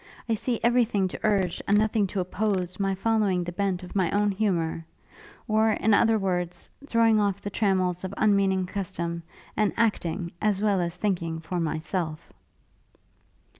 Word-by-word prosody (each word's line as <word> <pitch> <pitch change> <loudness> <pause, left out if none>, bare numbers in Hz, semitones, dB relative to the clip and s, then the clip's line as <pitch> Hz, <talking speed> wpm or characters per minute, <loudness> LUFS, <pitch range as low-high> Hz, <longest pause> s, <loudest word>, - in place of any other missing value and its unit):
I 230 - +1
see 235 +2 -1
every 240 +1 +4
thing 205 -4 0
to - - -7
urge, 195 -5 +1
and 205 - +4
nothing 215 -1 +2
to 195 - -3
oppose 185 -1 -1
my 195 -1 0
following 200 -3 +1
the 175 - -5
bent 185 -1 -1
of 180 - -10
my 185 -4 +2
own 205 0 +2
humour; 180 -6 -1 0.6
or, 220 0 +3
in 220 0 +2
other 225 +1 +4
words, 180 -3 -2 0.2
throwing 230 -4 +4
off 200 -2 +1
the 205 - -6
trammels 185 -3 +1
of 190 - -4
unmeaning 195 -3 +2
custom, 170 -3 -4 0.3
and 215 -1 +2
acting, 175 -6 0
as 210 -2 +1
well 205 -3 +2
as 170 0 -2
thinking, 175 -4 -2
for 175 +2 -4
myself.' 160 0 -3
195 Hz, 165 wpm, -26 LUFS, 180-215 Hz, 0.6 s, every